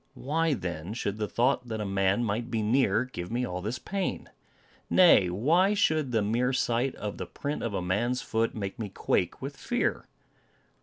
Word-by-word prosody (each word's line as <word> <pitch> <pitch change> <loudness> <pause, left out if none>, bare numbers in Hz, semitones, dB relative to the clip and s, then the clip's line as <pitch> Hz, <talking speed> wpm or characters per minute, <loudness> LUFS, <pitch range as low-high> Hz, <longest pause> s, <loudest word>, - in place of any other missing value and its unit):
Why, 160 +2 0
then, 85 0 -5
should 100 -3 -2
the 105 -1 -2
thought 125 +2 +1
that 110 -2 -4
a 105 - -2
man 95 +3 +1
might 115 +2 -2
be 110 -2 -1
near 115 0 +2
give 90 -9 -7
me 125 +2 0
all 90 -4 -4
this 110 +6 -3
pain? 195 +10 -3 0.6
Nay, 165 - +6
why 165 - +3
should 155 -9 +2
the 110 -3 +2
mere 120 +5 +1
sight 125 +1 0
of 105 -1 -5
the - - -4
print 145 +1 -4
of 115 -4 -2
a 90 - -2
man's 120 +8 0
foot, 115 0 -1
make 100 -1 -5
me 105 -3 -3
quake - - -1
with - - -5
fear? - - -1
115 Hz, 190 wpm, -28 LUFS, 100-130 Hz, 0.6 s, Nay